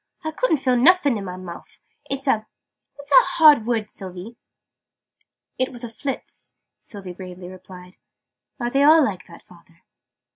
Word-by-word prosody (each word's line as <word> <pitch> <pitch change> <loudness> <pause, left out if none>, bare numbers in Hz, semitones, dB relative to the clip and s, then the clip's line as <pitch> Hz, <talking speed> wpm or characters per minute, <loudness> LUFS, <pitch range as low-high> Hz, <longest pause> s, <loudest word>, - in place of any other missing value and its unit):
"I 315 - -3
couldn't 320 -1 +1
feel 255 -2 +1
nuffin 290 +1 +4
in 200 -2 -5
my 180 -1 -6
mouf! 175 -2 -11 0.3
It's 275 0 -4
a 220 -5 0 0.5
what's 285 0 -12
that 275 - +7
hard 300 -8 +6
word, 225 -3 -1
Sylvie?" 190 +3 -10 1.2
"It 255 - 0
was 245 -1 -10
a 240 - -5
Phlizz," 265 +4 -7 0.2
Sylvie 195 -4 -10
gravely 180 0 -10
replied. 185 0 -13 0.6
"Are 240 0 -2
they 275 - +2
all 310 +2 +6
like 185 -5 -5
that, 170 - -15
father?" 170 -1 -21
225 Hz, 155 wpm, -22 LUFS, 185-275 Hz, 1.2 s, that